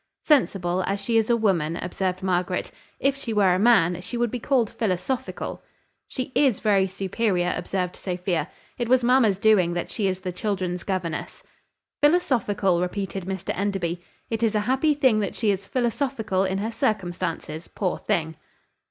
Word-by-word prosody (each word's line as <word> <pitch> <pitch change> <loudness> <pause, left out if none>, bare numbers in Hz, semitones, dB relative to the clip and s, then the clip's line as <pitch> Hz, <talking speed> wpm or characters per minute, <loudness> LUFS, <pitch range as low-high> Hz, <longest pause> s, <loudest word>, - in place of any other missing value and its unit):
"Sensible, 190 - +2
as 200 +1 -1
she 225 +4 -2
is 225 0 +3
a 235 - +4
woman," 170 -7 +1
observed 185 +1 -3
Margaret; 180 -1 -1 0.3
"if 275 0 +2
she 260 -5 -5
were 195 -4 +4
a 180 - +1
man, 180 -6 +4
she 240 +7 -5
would 240 -2 0
be 250 - -3
called 245 -2 +2
philosophical." 225 +2 -3 0.5
"She 260 0 -5
is 265 -8 +3
very 200 -3 +3
superior," 190 -1 0
observed 180 -2 -2
Sophia. 180 -4 -2 0.3
"It 240 -1 -1
was 255 -1 +4
mamma's 235 -5 +4
doing 195 -5 +4
that 175 - -3
she 205 -3 0
is 185 0 -2
the 185 -1 -3
children's 180 -2 -2
governess." 180 -5 -4 0.6
"Philosophical!" 235 - +2
repeated 190 0 -3
Mr 190 0 -3
Enderby. 185 -3 -2 0.3
"It 225 0 -1
is 225 -2 +2
a 210 - +2
happy 265 +7 +2
thing 260 -7 +3
that 200 -3 -2
she 220 -3 +2
is 200 0 -3
philosophical 235 -5 0
in 190 0 -1
her 215 +3 -2
circumstances, 175 -6 -2
poor 185 -3 -2
thing!" 160 -2 -1
195 Hz, 165 wpm, -25 LUFS, 180-230 Hz, 0.6 s, a